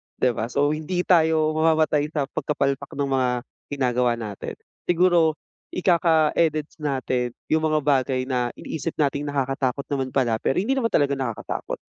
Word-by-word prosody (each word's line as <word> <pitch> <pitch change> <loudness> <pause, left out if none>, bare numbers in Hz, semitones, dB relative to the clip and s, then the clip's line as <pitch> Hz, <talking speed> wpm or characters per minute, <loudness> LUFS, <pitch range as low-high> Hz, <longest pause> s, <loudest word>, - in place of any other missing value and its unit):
'di 125 - +2
ba? 115 0 -3
So 145 +4 +1
hindi 160 +4 -2
tayo 160 -3 +3
mamamatay 155 -1 +2
sa 145 - +1
pagkapalpak 140 -1 -2
ng 140 -1 -1
mga 130 -2 +2 0.5
ginagawa 125 -2 +1
natin, 105 -4 -6 0.3
siguro 175 -3 +4 0.4
ikaka-edids 160 -3 +2
natin 130 -4 -1 0.2
yung 155 0 +3
mga 155 -2 +1
bagay 130 -2 +1
na 125 -2 -1
iniisip 160 +1 -5
nating 145 -1 0
nakakatakot 135 -1 -1
naman 135 -2 0
pala 125 -4 0
pero 135 - 0
hindi 210 +8 0
naman 265 -4 +2
talaga 145 -9 +2
nakakatakot. 120 -2 -4
145 Hz, 145 wpm, -24 LUFS, 130-160 Hz, 0.5 s, siguro